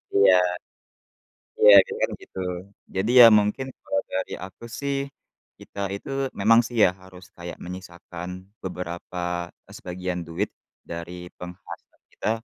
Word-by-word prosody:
Iya. 100 Hz, -2 st, +7 dB, 1.3 s
Iya, 105 Hz, -1 st, +9 dB
karena -, -, -7 dB
kan -, -, -8 dB
gitu, -, -, -11 dB, 0.6 s
jadi 95 Hz, +5 st, 0 dB
ya, 120 Hz, -, +12 dB
mungkin 105 Hz, +6 st, 0 dB
kalau 115 Hz, -, -1 dB
dari 95 Hz, -, -2 dB
aku 95 Hz, +5 st, -12 dB, 0.2 s
sih, 140 Hz, 0 st, -1 dB, 0.6 s
kita 100 Hz, -, -9 dB, 0.2 s
itu -, -, -11 dB, 0.3 s
memang 115 Hz, +3 st, +6 dB
sih 120 Hz, -, -8 dB
ya, -, -, +5 dB
harus 95 Hz, -1 st, -13 dB
kayak 85 Hz, 0 st, -7 dB
menyisakan 90 Hz, -1 st, -8 dB, 0.4 s
beberapa, 90 Hz, -1 st, -4 dB, 0.3 s
sebagian 90 Hz, -1 st, -4 dB
duit 85 Hz, +5 st, -2 dB, 0.4 s
dari 90 Hz, +1 st, -7 dB
penghasilan 90 Hz, 0 st, -11 dB
kita -, -, -2 dB
90 Hz, 125 wpm, -25 LUFS, 90-100 Hz, 1.3 s, ya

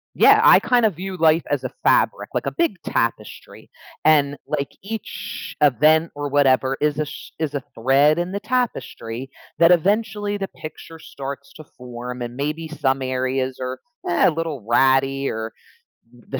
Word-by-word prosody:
Yeah, -, -, +6 dB
I -, -, +8 dB
kind 245 Hz, -2 st, +2 dB
of 200 Hz, -7 st, +1 dB
view 190 Hz, +2 st, -6 dB
life 160 Hz, 0 st, +4 dB
as -, -, -1 dB
a -, -, -3 dB
fabric, -, -, +2 dB
like -, -, -2 dB
a -, -, 0 dB
big 335 Hz, -, -1 dB
tapestry, 115 Hz, -2 st, -3 dB, 0.3 s
and, 145 Hz, -2 st, +3 dB
like, 140 Hz, -, -2 dB
each 220 Hz, +2 st, -7 dB
event 155 Hz, +4 st, +4 dB
or 145 Hz, 0 st, -3 dB
whatever 135 Hz, -1 st, +3 dB
is 150 Hz, -1 st, +1 dB
a 155 Hz, -, 0 dB
sh -, -, -10 dB
is 150 Hz, -2 st, -2 dB
a 140 Hz, -, -3 dB
thread 140 Hz, +6 st, +3 dB
in 175 Hz, +2 st, -2 dB
the 200 Hz, -, -3 dB
tapestry 135 Hz, -, -3 dB, 0.3 s
that 170 Hz, +1 st, +6 dB
eventually 205 Hz, +3 st, +1 dB
the 195 Hz, -1 st, -3 dB
picture 160 Hz, +1 st, -10 dB
starts 140 Hz, -1 st, -8 dB
to 155 Hz, -, -11 dB
form 125 Hz, -2 st, -9 dB
and 120 Hz, 0 st, -5 dB
maybe 150 Hz, +4 st, -3 dB
some 135 Hz, -4 st, -1 dB
areas 130 Hz, 0 st, -2 dB
are, 130 Hz, 0 st, -4 dB, 0.3 s
uh, 175 Hz, +1 st, +4 dB
a -, -, -1 dB
little 155 Hz, -7 st, -4 dB
ratty 135 Hz, +2 st, +2 dB
or 110 Hz, 0 st, -4 dB, 0.6 s
the 125 Hz, +2 st, -7 dB
145 Hz, 170 wpm, -21 LUFS, 130-170 Hz, 0.6 s, I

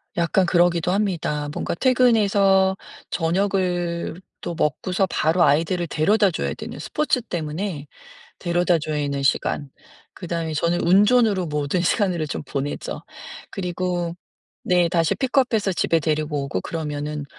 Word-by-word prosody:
약간 175 Hz, +3 st, +2 dB
그러기도 175 Hz, -1 st, +2 dB
합니다. 175 Hz, -7 st, -1 dB
뭔가 -, -, -3 dB
퇴근해서 200 Hz, -6 st, +3 dB, 0.3 s
저녁을 175 Hz, -1 st, -1 dB, 0.2 s
또 170 Hz, -, -4 dB
먹고서 180 Hz, +5 st, 0 dB
바로 170 Hz, 0 st, +2 dB
아이들을 170 Hz, +4 st, +2 dB
데려다줘야 195 Hz, +4 st, +1 dB
되는 -, -, -8 dB
스포츠 300 Hz, -4 st, 0 dB
때문에 165 Hz, -4 st, -4 dB, 0.5 s
데려다줘야 175 Hz, -3 st, +1 dB
되는 140 Hz, -1 st, -2 dB
시간 140 Hz, +1 st, 0 dB, 0.4 s
그다음에 165 Hz, -3 st, -4 dB
저는 170 Hz, +3 st, 0 dB
운전으로 205 Hz, +1 st, +4 dB
모든 150 Hz, +3 st, -1 dB
시간을 175 Hz, -3 st, +1 dB
좀 -, -, -4 dB
보내죠. 140 Hz, +1 st, -4 dB, 0.5 s
그리고 180 Hz, -2 st, -2 dB, 0.5 s
네. 180 Hz, -1 st, +3 dB
다시 165 Hz, -2 st, +1 dB
픽업해서 250 Hz, -6 st, +1 dB
집에 165 Hz, -1 st, +1 dB
데리고 150 Hz, -1 st, -1 dB
오고 95 Hz, -9 st, -3 dB
그러면은 150 Hz, -, -4 dB
175 Hz, 310 characters per minute, -22 LUFS, 155-190 Hz, 0.5 s, 운전으로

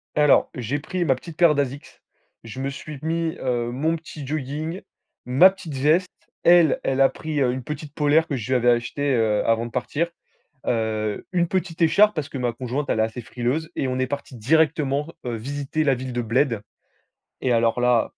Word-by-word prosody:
Alors, 150 Hz, -1 st, +4 dB
j'ai 125 Hz, +4 st, -2 dB
pris 175 Hz, +4 st, -2 dB
ma 135 Hz, -, +4 dB
petite 160 Hz, +5 st, -11 dB
paire 170 Hz, -3 st, +6 dB
d'Asics, 140 Hz, 0 st, -4 dB, 0.4 s
je 115 Hz, +2 st, -8 dB
me 135 Hz, +1 st, -2 dB
suis 145 Hz, +2 st, -8 dB
mis, 165 Hz, 0 st, -1 dB
heu, 120 Hz, -2 st, -1 dB
mon 155 Hz, +6 st, 0 dB
petit 155 Hz, -3 st, -9 dB
jogging, 155 Hz, +5 st, -4 dB, 0.4 s
ma 135 Hz, +10 st, +7 dB
petite 170 Hz, -6 st, -8 dB
veste. 155 Hz, +7 st, +2 dB, 0.3 s
Elle, 170 Hz, -4 st, +5 dB
elle 135 Hz, 0 st, 0 dB
a 135 Hz, -, +6 dB
pris, 155 Hz, -2 st, -3 dB
heu, 125 Hz, -2 st, +3 dB
une 130 Hz, 0 st, -4 dB
petite 150 Hz, +1 st, -7 dB
polaire 155 Hz, +1 st, +3 dB
que 145 Hz, -, -2 dB
je 120 Hz, -3 st, -5 dB
lui 130 Hz, -, +2 dB
avais 120 Hz, 0 st, +3 dB
achetée, 125 Hz, +4 st, +1 dB
heu, 110 Hz, -3 st, +1 dB
avant 115 Hz, 0 st, +2 dB
de -, -, -12 dB
partir. 145 Hz, +7 st, -1 dB, 0.6 s
Heu, 110 Hz, -2 st, -1 dB
une 175 Hz, -2 st, +1 dB
petite 175 Hz, -2 st, -2 dB
écharpe 210 Hz, +6 st, +5 dB
parce 155 Hz, -3 st, -3 dB
que 140 Hz, -, -8 dB
ma 125 Hz, -2 st, 0 dB
conjointe, 130 Hz, +4 st, -3 dB
elle -, -, +1 dB
est -, -, +4 dB
assez 110 Hz, +2 st, -2 dB
frileuse, 130 Hz, +8 st, -2 dB
et 135 Hz, -, -1 dB
on 130 Hz, 0 st, -2 dB
est 130 Hz, -, +1 dB
parti 140 Hz, -1 st, -6 dB
directement, 150 Hz, +2 st, +2 dB, 0.2 s
heu, 120 Hz, -2 st, -3 dB
visiter 140 Hz, +5 st, -3 dB
la 135 Hz, -3 st, +3 dB
ville 130 Hz, 0 st, -6 dB
de 120 Hz, -, -1 dB
Bled. 120 Hz, 0 st, +1 dB, 0.8 s
Et 130 Hz, -, +1 dB
alors 115 Hz, 0 st, +2 dB
là 125 Hz, -2 st, +2 dB
140 Hz, 200 wpm, -23 LUFS, 125-155 Hz, 0.8 s, ma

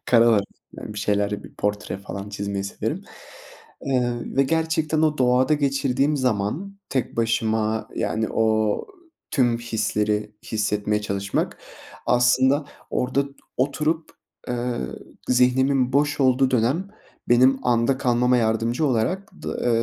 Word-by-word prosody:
karalarım, 115 Hz, -4 st, +4 dB, 0.3 s
yani, 105 Hz, -, -7 dB
bir -, -, -5 dB
şeyler, 105 Hz, +1 st, 0 dB
bir -, -, -13 dB
portre 105 Hz, -1 st, -2 dB
falan 100 Hz, 0 st, -7 dB
çizmeyi 100 Hz, -1 st, -3 dB
severim. 100 Hz, -, -4 dB, 0.8 s
Eee, 125 Hz, -3 st, +1 dB, 0.2 s
ve 135 Hz, -, +5 dB
gerçekten 160 Hz, +1 st, 0 dB
o 155 Hz, -2 st, +2 dB
doğada 130 Hz, +3 st, +3 dB
geçirdiğim 140 Hz, 0 st, +1 dB
zaman 130 Hz, -, -1 dB
tek 130 Hz, -4 st, -2 dB
başıma, 110 Hz, -1 st, 0 dB
yani, 110 Hz, 0 st, -1 dB
o 110 Hz, -1 st, +1 dB, 0.4 s
tüm 120 Hz, -4 st, +2 dB
hisleri 105 Hz, -2 st, -1 dB
hissetmeye 105 Hz, -1 st, -1 dB
çalışmak, 100 Hz, -1 st, -2 dB, 0.5 s
aslında, 130 Hz, +4 st, +3 dB, 0.3 s
orada 130 Hz, +2 st, 0 dB, 0.3 s
oturup, 150 Hz, +4 st, 0 dB, 0.4 s
eee, 125 Hz, 0 st, -1 dB, 0.6 s
zihnimin 125 Hz, +1 st, +3 dB
boş 145 Hz, +1 st, +2 dB
olduğu 130 Hz, 0 st, +3 dB
dönem 130 Hz, -, +1 dB, 0.4 s
benim 130 Hz, +2 st, +5 dB
anda 120 Hz, +2 st, +2 dB
kalmama 125 Hz, 0 st, +2 dB
yardımcı 115 Hz, +5 st, +1 dB
olarak 135 Hz, -, 0 dB
d -, -, -8 dB
eee, 115 Hz, -1 st, +1 dB
125 Hz, 120 wpm, -23 LUFS, 110-135 Hz, 0.8 s, ve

